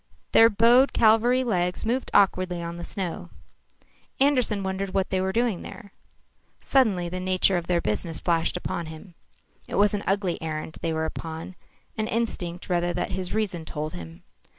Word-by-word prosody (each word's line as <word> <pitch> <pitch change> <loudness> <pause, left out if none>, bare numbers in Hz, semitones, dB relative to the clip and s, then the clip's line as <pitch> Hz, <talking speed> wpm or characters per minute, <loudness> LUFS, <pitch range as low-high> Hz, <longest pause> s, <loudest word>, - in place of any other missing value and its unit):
Their 225 0 +7
bowed 235 +5 +5
cavalry 235 +3 +4
legs 180 -6 -1
moved 250 +4 -1
awkwardly 185 -3 +2
on 170 0 -5
the 170 - -7
snow. 180 -1 -4 0.9
Andersen 250 -7 +2
wondered 190 0 -3
what 190 -1 0
they 185 - +1
were 190 0 0
doing 230 -4 0
there. 200 -5 -11 0.7
Suddenly 210 -10 +2
the 180 +1 -4
nature 185 +1 +2
of 175 -1 -2
their 175 -1 +1
business 150 +10 -2
flashed 170 0 0
upon 170 -2 -4
him. 160 +4 -11 0.5
It - - -5
was 205 0 +3
an 205 - -2
ugly 195 -3 0
errand 155 0 -5
they 165 - -1
were 160 0 -1
upon, 160 +2 -6 0.5
an 215 - 0
instinct 185 -7 -3
rather 175 -1 0
that - - -2
his 185 -1 -4
reason 195 -6 -1
told 155 -1 -5
him. 85 -1 -10
185 Hz, 170 wpm, -25 LUFS, 170-215 Hz, 0.9 s, Their